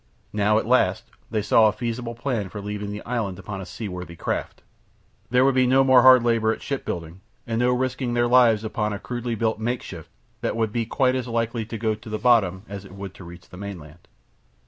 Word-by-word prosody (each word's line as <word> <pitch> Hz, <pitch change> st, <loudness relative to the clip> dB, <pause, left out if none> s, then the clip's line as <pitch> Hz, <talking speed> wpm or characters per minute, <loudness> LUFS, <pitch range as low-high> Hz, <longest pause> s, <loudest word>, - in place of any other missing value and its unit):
Now 105 Hz, +1 st, +2 dB
at -, -, 0 dB
last 110 Hz, -4 st, +2 dB, 0.3 s
they 110 Hz, -2 st, -1 dB
saw 110 Hz, +1 st, +5 dB
a -, -, +3 dB
feasible 115 Hz, +1 st, -4 dB
plan 115 Hz, -5 st, -2 dB
for 105 Hz, -, -7 dB
leaving 105 Hz, 0 st, -5 dB
the 105 Hz, 0 st, -7 dB
island 110 Hz, -6 st, -2 dB
upon 95 Hz, 0 st, -6 dB
a 95 Hz, -, -8 dB
seaworthy 90 Hz, -3 st, -7 dB
craft. -, -, -4 dB, 0.7 s
There 125 Hz, +3 st, +4 dB
would 135 Hz, -, +4 dB
be 130 Hz, -1 st, +3 dB
no 135 Hz, +2 st, +5 dB
more 130 Hz, -1 st, +6 dB
hard 130 Hz, -1 st, +8 dB
labour 115 Hz, -2 st, +2 dB
at -, -, -5 dB
ship 140 Hz, -2 st, -3 dB
building, 85 Hz, +1 st, -5 dB, 0.2 s
and 115 Hz, 0 st, -2 dB
no 125 Hz, +1 st, +3 dB
risking 125 Hz, -1 st, -1 dB
their 120 Hz, 0 st, +2 dB
lives 120 Hz, -3 st, +5 dB
upon 105 Hz, -1 st, -2 dB
a 100 Hz, -, -5 dB
crudely 120 Hz, -1 st, -4 dB
built 110 Hz, -1 st, -1 dB
makeshift 110 Hz, -8 st, -4 dB, 0.3 s
that -, -, -1 dB
would 110 Hz, -2 st, 0 dB
be 115 Hz, 0 st, -2 dB
quite 130 Hz, +1 st, +2 dB
as 130 Hz, -1 st, -2 dB
likely 115 Hz, -1 st, -2 dB
to 115 Hz, -, -5 dB
go 110 Hz, 0 st, 0 dB
to 110 Hz, +2 st, -10 dB
the 110 Hz, -, -2 dB
bottom 105 Hz, -5 st, +3 dB
as 100 Hz, -1 st, -7 dB
it 95 Hz, -, -13 dB
would 100 Hz, -1 st, -7 dB
to 95 Hz, -, -12 dB
reach 85 Hz, +1 st, -12 dB
the 90 Hz, -, -12 dB
mainland. 85 Hz, -5 st, -9 dB
110 Hz, 220 wpm, -24 LUFS, 100-120 Hz, 0.7 s, hard